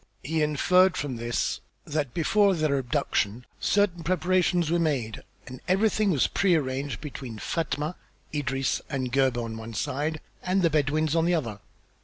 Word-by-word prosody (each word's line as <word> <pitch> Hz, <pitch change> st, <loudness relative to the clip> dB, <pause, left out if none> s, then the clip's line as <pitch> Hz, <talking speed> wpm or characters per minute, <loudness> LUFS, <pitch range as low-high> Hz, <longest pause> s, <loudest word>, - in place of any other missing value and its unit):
He 160 Hz, +2 st, -1 dB
inferred 180 Hz, +5 st, +4 dB
from 135 Hz, -4 st, -3 dB
this 120 Hz, +1 st, -1 dB, 0.2 s
that, 150 Hz, -4 st, -2 dB
before 195 Hz, -, +3 dB
their 155 Hz, -4 st, +1 dB
abduction, 125 Hz, -4 st, -1 dB
certain 200 Hz, -4 st, +2 dB
preparations 180 Hz, -2 st, +2 dB
were 170 Hz, -, +2 dB
made 135 Hz, -9 st, -1 dB, 0.2 s
and 130 Hz, +1 st, -9 dB
everything 210 Hz, +2 st, +2 dB
was 150 Hz, -8 st, +3 dB
pre 190 Hz, -3 st, +2 dB
arranged 135 Hz, -4 st, -2 dB
between 130 Hz, -6 st, -7 dB
Fatma, 155 Hz, +5 st, -2 dB, 0.4 s
Idris, 135 Hz, -2 st, -1 dB
and 130 Hz, -3 st, -2 dB
Gebhr 130 Hz, -2 st, +2 dB
on 110 Hz, -1 st, -6 dB
one 115 Hz, 0 st, -8 dB
side 150 Hz, +6 st, -2 dB, 0.2 s
and 185 Hz, +1 st, +1 dB
the 165 Hz, -, +3 dB
Bedouins 155 Hz, +1 st, +1 dB
on 165 Hz, 0 st, +3 dB
the 175 Hz, 0 st, +3 dB
other. 115 Hz, -10 st, -3 dB
150 Hz, 155 wpm, -27 LUFS, 130-175 Hz, 0.4 s, inferred